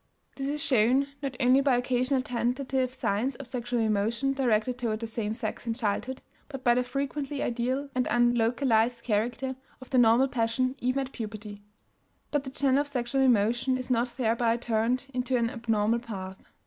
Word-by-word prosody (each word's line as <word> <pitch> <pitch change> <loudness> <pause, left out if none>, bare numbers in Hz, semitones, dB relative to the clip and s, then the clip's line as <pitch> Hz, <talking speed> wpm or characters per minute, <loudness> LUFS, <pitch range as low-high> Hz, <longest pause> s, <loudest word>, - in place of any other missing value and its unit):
This 275 -1 -3
is 295 0 -1
shown 255 +2 +3 0.2
not 275 -3 -3
only 255 +1 +5
by 270 -3 +3
occasional 255 +1 +1
tentative 255 0 -1
signs 255 0 -1
of 275 - -8
sexual 245 -1 -3
emotion 225 +5 +1
directed 250 -2 +1
toward 220 -3 -1
the 230 - -3
same 225 -2 -3
sex 220 0 -4
in 225 - 0
childhood, 245 +3 -2 0.3
but 270 -3 -7
by 240 -2 +5
the 250 - +2
frequently 275 +2 -3
ideal 255 +4 -1
and 250 -1 0
unlocalized 240 0 +2
character 240 +4 -1 0.2
of 260 - -13
the 255 - +4
normal 240 +3 +5
passion 255 +1 0
even 255 +2 0
at 260 - -12
puberty. 210 -2 -7 0.7
But 290 -1 0
the - - -4
channel 270 0 +2
of 290 - -4
sexual 265 -1 -1
emotion 240 +1 +3
is 255 0 -5
not 245 +1 0
thereby 230 -1 +1
turned 240 +2 0
into 255 0 0
an 230 -1 0
abnormal 225 -1 +1
path. 190 -5 -7
245 Hz, 175 wpm, -28 LUFS, 230-260 Hz, 0.7 s, only